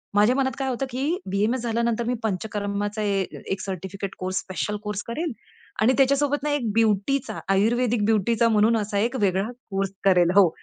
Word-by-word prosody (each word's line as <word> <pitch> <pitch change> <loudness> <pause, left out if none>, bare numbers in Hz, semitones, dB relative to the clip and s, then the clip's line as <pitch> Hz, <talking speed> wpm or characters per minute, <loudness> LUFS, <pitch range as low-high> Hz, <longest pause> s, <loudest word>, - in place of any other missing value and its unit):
माझ्या 210 +5 +5
मनात 265 -1 +1
काय 265 -1 -1
होतं, 260 +2 -2
की 280 +8 -1
बी-ए-एम-एस 215 +6 +1
झाल्यानंतर 235 0 0
मी 250 - +1
पंचकर्माचा 205 +1 -2
एक 195 -1 -2
सर्टिफिकेट 190 +1 -5
कोर्स, 185 0 -2
स्पेशल 205 +2 -3
कोर्स 210 -1 -3
करेल 310 +7 -2 0.5
आणि 250 +4 +5
त्याच्यासोबत 280 +1 +2
ना 300 - 0
एक 245 -7 0
ब्युटीचा, 220 +2 +1
आयुर्वेदिक 225 +2 +2
ब्युटीचा 225 +2 +2
म्हणून 220 +1 +4
असा 205 -1 -2
एक 235 +5 0
वेगळा 190 0 +2 0.3
कोर्स 195 0 -1
करेल. 180 -2 +5
हो, 195 -4 +7
215 Hz, 165 wpm, -24 LUFS, 195-245 Hz, 0.5 s, हो